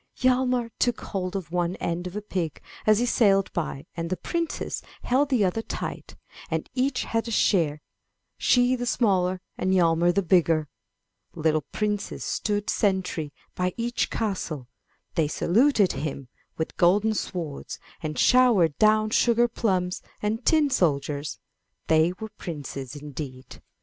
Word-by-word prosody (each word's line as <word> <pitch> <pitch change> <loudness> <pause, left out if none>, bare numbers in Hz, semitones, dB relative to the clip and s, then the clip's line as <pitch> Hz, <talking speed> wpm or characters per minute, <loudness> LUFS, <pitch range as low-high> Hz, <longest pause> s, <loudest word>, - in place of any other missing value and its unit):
Hjalmar 250 -2 +2
took 245 -2 +1
hold 185 -1 -4
of 175 -5 -4
one 175 0 0
end 175 +1 -3
of 180 - -8
a 210 - -4
pig 175 -7 -3 0.3
as 215 -1 +6
he 240 - +2
sailed 195 -5 +3
by, 155 -5 -3
and 165 0 -3
the 185 - -1
princess 335 -1 -3 0.2
held 270 +3 +2
the 245 -7 +3
other 190 +5 0
tight, - - -6 0.3
and - - -2
each 255 0 0
had 225 +1 -1
a - - -3
share, 160 -9 +2 0.5
she 245 0 +3
the 245 -1 -3
smaller 185 -6 +1 0.2
and 185 +1 +2
Hjalmar 170 -1 +4
the 200 +2 +1
bigger! 165 -4 +3 0.7
Little 155 -1 +1
princes 210 -1 -2
stood 205 -1 -1
sentry 185 -7 0 0.2
by 180 0 -1
each 240 +1 -1
castle; 175 - -3 0.5
they 160 -2 +2
saluted 210 - +3 0.6
with 160 - -3
golden 205 +5 +4
swords 170 -8 -4 0.2
and 155 -2 -4
showered 230 - +5
down 215 0 +4
sugar 235 +1 +4
plums 185 -6 -1 0.2
and 220 +3 -2
tin 305 -1 +3
soldiers; 150 - 0 0.5
they 160 +2 +4
were 220 - -5
princes 140 -5 -6
indeed. 140 -3 -8
190 Hz, 140 wpm, -26 LUFS, 165-225 Hz, 0.7 s, as